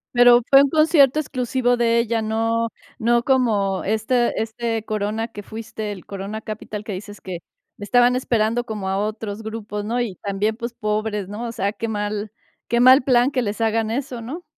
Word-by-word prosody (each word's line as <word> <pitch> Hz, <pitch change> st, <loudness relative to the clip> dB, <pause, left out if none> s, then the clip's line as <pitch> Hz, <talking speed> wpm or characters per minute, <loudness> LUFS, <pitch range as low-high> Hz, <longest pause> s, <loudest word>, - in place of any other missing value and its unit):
Pero 245 Hz, 0 st, +7 dB
fue 275 Hz, 0 st, +8 dB
un 280 Hz, -, +1 dB
concierto 310 Hz, -2 st, +4 dB
exclusivo 250 Hz, -3 st, 0 dB
de 235 Hz, 0 st, +3 dB
ella, 230 Hz, -1 st, 0 dB
no 225 Hz, +1 st, 0 dB, 0.3 s
no 235 Hz, 0 st, +2 dB
como 215 Hz, -8 st, +1 dB
este 220 Hz, +4 st, +1 dB
este 225 Hz, 0 st, -3 dB
Corona 215 Hz, +1 st, -2 dB
que 205 Hz, -3 st, -10 dB
fuiste, 220 Hz, -1 st, -6 dB
el 190 Hz, -3 st, -9 dB
Corona 200 Hz, +2 st, -6 dB
Capital 215 Hz, -1 st, -6 dB
que 210 Hz, -, -5 dB
dices 205 Hz, +2 st, -8 dB
que 180 Hz, -3 st, -6 dB, 0.4 s
estaban 245 Hz, +4 st, +3 dB
esperando 235 Hz, -1 st, +1 dB
como 210 Hz, -5 st, -4 dB
a 190 Hz, -, 0 dB
otros 215 Hz, 0 st, -4 dB
grupos, 215 Hz, -2 st, -5 dB
¿no? 240 Hz, +3 st, -1 dB
Y 210 Hz, -6 st, -3 dB
también, 205 Hz, +3 st, -2 dB
pues, 235 Hz, 0 st, -5 dB
pobres, 210 Hz, -2 st, -2 dB
¿no? 215 Hz, +4 st, -6 dB
O -, -, -4 dB
sea, 200 Hz, -2 st, -2 dB
qué 230 Hz, -, -4 dB
mal 210 Hz, 0 st, -3 dB, 0.4 s
qué 235 Hz, -, +1 dB
mal 255 Hz, +1 st, +7 dB
plan 255 Hz, +1 st, +3 dB
que 255 Hz, -, 0 dB
les 210 Hz, 0 st, -3 dB
hagan 225 Hz, 0 st, +1 dB
eso, 250 Hz, -1 st, -3 dB
¿no? 305 Hz, +10 st, -7 dB
225 Hz, 185 wpm, -22 LUFS, 210-240 Hz, 0.4 s, fue